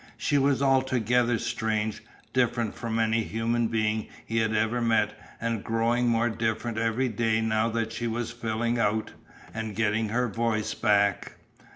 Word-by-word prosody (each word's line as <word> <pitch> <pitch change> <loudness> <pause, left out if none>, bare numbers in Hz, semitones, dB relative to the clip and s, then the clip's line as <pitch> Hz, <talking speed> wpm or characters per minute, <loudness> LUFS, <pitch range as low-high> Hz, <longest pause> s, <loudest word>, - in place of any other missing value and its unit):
She 145 -2 +1
was 140 0 +2
altogether 125 -3 +2
strange, 110 -2 -2 0.3
different 120 -3 +1
from 115 -2 -3
any 115 0 +2
human 115 +1 0
being 110 -1 0 0.2
he 115 - -3
had 110 -1 +1
ever 110 +2 +1
met 115 -2 +2 0.3
and 115 -2 -2
growing 115 +2 +1
more 115 0 +2
different 110 0 -2
every 115 +3 +1
day 110 -1 +1
now 110 0 +1
that 115 0 -2
she 120 - -3
was 115 0 -2
"filling 115 0 -1
out," 110 0 0 0.4
and 110 -2 -4
getting 110 0 +1
her 125 +3 +1
voice 110 0 -1
back. 100 -1 +1
115 Hz, 155 wpm, -27 LUFS, 110-120 Hz, 0.4 s, was